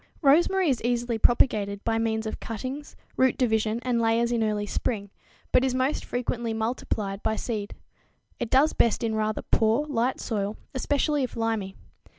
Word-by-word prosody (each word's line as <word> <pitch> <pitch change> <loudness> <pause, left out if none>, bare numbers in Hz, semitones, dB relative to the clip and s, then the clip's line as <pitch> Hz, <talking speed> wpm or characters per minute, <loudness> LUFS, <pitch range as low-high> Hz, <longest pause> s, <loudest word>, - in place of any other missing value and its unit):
_ - - -32 0.2
Rosemary 345 +6 +4
is 260 -6 +1
easily 240 -1 -1
propagated 210 -4 +2
by 225 0 0
means 220 -1 -1
of 220 - -4
cuttings, 255 +6 -6 0.2
root 260 -1 +3
division 220 -3 +1
and 245 -2 +1
layers 230 +1 +2
in 235 -2 +1
early 210 -1 0
spring, 200 -1 -3 0.4
but 250 - +4
is 260 -1 +1
most 260 +3 0
frequently 240 -2 -2
multiplied 220 -3 -2
by 220 - 0
seed. 215 -3 -4 0.6
It 235 - -2
does 275 +5 +4
best 235 0 +2
in 225 -1 0
rather 215 0 -1
poor, 225 +6 +2
light 260 -3 0
soil, 205 -2 -2 0.2
especially 285 +2 +1
if 255 - -3
limy. 220 -4 -1
230 Hz, 165 wpm, -26 LUFS, 220-255 Hz, 0.6 s, Rosemary